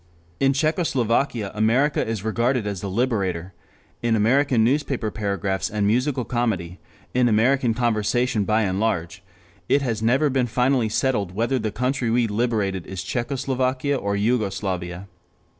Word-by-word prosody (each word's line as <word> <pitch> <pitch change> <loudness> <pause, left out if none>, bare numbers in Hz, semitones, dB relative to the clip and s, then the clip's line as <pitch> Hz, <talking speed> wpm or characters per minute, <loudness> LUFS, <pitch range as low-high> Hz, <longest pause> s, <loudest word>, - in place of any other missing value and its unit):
In 135 0 +4
Czechoslovakia 135 - 0
America 120 +7 +2
is 110 -3 -3
regarded 115 +2 0
as 100 -3 -3
the 100 - -4
Liberator; 95 -5 -1 0.5
in 115 -1 +2
American 120 +2 +3
newspaper 130 -3 0
paragraphs 100 -2 -2
and 105 -1 -1
musical 125 +4 +1
comedy, 105 -8 -2 0.3
in 125 -1 +3
American 120 +2 +2
conversation 120 -1 +1
by 110 +2 +2
and 95 -1 -1
large, 100 -3 -1 0.5
it 140 - +3
has 115 -4 -2
never 135 +6 +2
been 130 -2 +1
finally 125 0 +1
settled 105 -6 0
whether 120 +5 0
the 110 -1 -2
country 125 +2 -1
we 120 +1 +2
liberated 105 -4 -1
is 95 -1 -5
Czechoslavia 130 +4 -1
or 100 -5 -1
Jugoslovakia. 100 -5 -2
115 Hz, 140 wpm, -23 LUFS, 100-125 Hz, 0.5 s, In